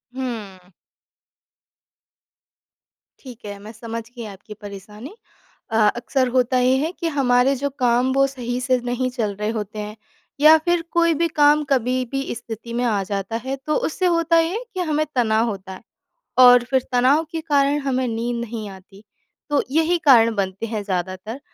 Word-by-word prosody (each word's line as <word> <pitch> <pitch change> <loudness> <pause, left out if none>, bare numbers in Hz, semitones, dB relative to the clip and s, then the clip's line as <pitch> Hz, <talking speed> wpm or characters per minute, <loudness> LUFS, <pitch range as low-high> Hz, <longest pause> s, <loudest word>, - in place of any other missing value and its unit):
हुँ। 210 -8 -6 2.5
ठीक 250 -4 -11
है। 205 -1 -6
मैं 210 +2 -10
समझ 230 0 -6
गई 240 -1 -9
आपकी 200 +2 -12
परेशानी। 210 - -10 0.6
अ, 225 - +1 0.2
अक्सर 255 +2 0
होता 255 0 +2
ये 250 +1 +3
है 310 +5 -1
कि 335 - -1
हमारे 250 0 +3
जो 280 - +1
काम, 245 +2 +3
वो 275 0 +4
सही 250 -2 -4
से 255 -1 +3
नहीं 255 +1 -1
चल 210 -4 -1
रहे 210 0 -1
होते 210 +1 -6
हैं, 210 0 -6 0.4
या 310 +2 +8
फिर 345 -1 +2
कोई 335 -1 +3
भी 335 +2 +1
काम 295 +1 +5
कभी 255 -1 +2 0.2
भी 270 0 -1
स्थिति 230 0 -8
में 240 +1 -1
आ 210 -4 +1
जाता 200 +1 -3
है, 265 +1 -2
तो 295 +3 -3
उससे 370 +4 -2
होता 335 0 +2
ये 330 0 +1
है 475 - -6
कि 370 - -5
हमें 305 0 +1
तनाव 225 -2 +2
होता 190 -2 -7
है, 185 - -11 0.6
और 245 -1 +8
फिर 265 -1 +3
तनाव 255 +5 +3
के 325 -2 -3
कारण 280 +1 +3
हमें 260 -1 0
नींद 235 +1 -2
नहीं 220 -2 -6
आती। 195 +1 -14 0.5
तो 290 -1 +2
यही 325 +4 +2
कारण 230 -3 +6
बनते 195 +1 -2
हैं 215 -2 -4
ज़्यादातर। 185 +4 -4
245 Hz, 175 wpm, -21 LUFS, 215-275 Hz, 2.5 s, या